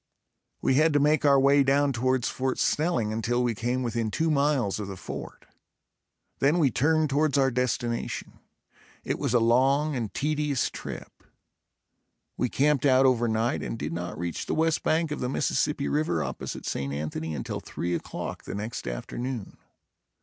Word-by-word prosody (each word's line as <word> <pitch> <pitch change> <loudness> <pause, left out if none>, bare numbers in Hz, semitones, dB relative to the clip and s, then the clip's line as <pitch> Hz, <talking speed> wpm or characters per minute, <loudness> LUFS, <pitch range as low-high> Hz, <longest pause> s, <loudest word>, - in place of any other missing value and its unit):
We - - +3
had 155 +3 +4
to 145 - +4
make 150 +1 +3
our 140 -1 +6
way 140 +1 +5
down 140 +1 +3
towards 130 0 +1
Fort 130 0 -2
Snelling 150 -9 +1
until 120 +3 0
we 120 -1 +1
came 120 +4 -1
within 115 -2 -1
two 160 +8 0
miles 140 -8 +1
of 105 - -4
the 95 -1 -7
fort. - - -8 0.9
Then 145 +5 +3
we 145 -7 +3
turned 155 +6 +2
towards 145 0 +2
our 135 -1 +3
destination. 120 -1 -2 0.6
It - - -2
was 125 - 0
a - - +6
long 135 +6 +3
and 115 -5 -3
tedious 150 -3 0
trip. - - -8 1.1
We 125 - 0
camped 145 +1 +2
out 130 0 +5
over 120 -2 +3
night 110 +1 0
and - - -4
did 85 - -4
not 85 0 -4
reach 85 0 -4
the - - -1
west 160 0 +1
bank 160 0 +1
of 150 - -3
the 125 - -2
Mississippi 140 +1 0
River 145 - 0
opposite - - -5
St. 70 0 -2
Anthony 75 +2 -4
until 65 - -4
three 85 +1 -4
o'clock - - -5
the - - -5
next 110 +3 -5
afternoon. 115 - -5
130 Hz, 170 wpm, -27 LUFS, 115-145 Hz, 1.1 s, our